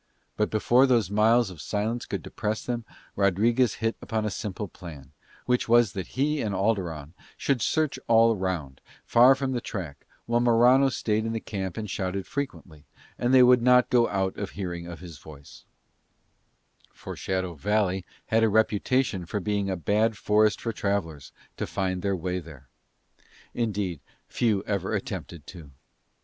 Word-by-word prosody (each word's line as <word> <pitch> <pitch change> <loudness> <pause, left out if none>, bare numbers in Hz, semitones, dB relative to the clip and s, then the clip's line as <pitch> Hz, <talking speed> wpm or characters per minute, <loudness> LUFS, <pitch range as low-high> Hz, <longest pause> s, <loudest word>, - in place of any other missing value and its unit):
But 105 - 0
before 120 +5 +3
those 115 -7 +2
miles 110 +1 +3
of 80 -4 -10
silence 110 +3 -2
could - - -4
depress 110 0 -4
them 120 -2 -3 0.3
Rodriguez 110 +5 +2
hit 115 0 -2
upon 110 -1 -2
a 105 - -1
simple 100 +3 -5
plan, 75 -7 -11 0.3
which 125 -2 0
was 120 -3 +4
that 95 +4 -7
he 150 +2 +1
and 105 -3 -2
Alderon 90 -8 -1 0.2
should 135 -4 0
search 155 +5 0
all 115 0 +5
round, 90 -9 -4 0.2
far 125 +3 +6
from 135 -1 -2
the 125 -2 -2
track, 85 -12 -7 0.2
while 120 0 +1
Morano 120 +3 +5
stayed 110 -3 -1
in 115 0 -2
the 115 - -2
camp 95 -5 -5
and 110 -1 -4
shouted 95 0 -3
frequently, 95 - -6 0.3
and 120 +1 +1
they 130 -1 +7
would 125 -1 +6
not 125 0 +4
go 120 -1 +4
out 95 -1 -1
of 100 -2 -4
hearing 85 -3 -4
of 85 -2 -9
his 85 -6 -10
voice: 70 -2 -14 1.3
for - - -9
Shadow 95 -2 -2
Valley 95 +2 0 0.2
had 115 +1 +2
a 110 - +4
reputation 110 -2 +1
of 105 -3 -2
being 100 -1 -1
a 95 - -2
bad 105 +6 +1
forest 105 +1 +2
for 115 - -3
travellers 90 -9 -3 0.3
to - - -3
find 95 -2 -2
their 100 0 0
way 90 +1 -3
there; 75 -6 -13 0.9
indeed, 105 -8 -2 0.3
few 105 -5 0
ever 100 -4 -2
attempted 80 -4 -6
to. 85 -6 -11
105 Hz, 165 wpm, -26 LUFS, 90-115 Hz, 1.3 s, they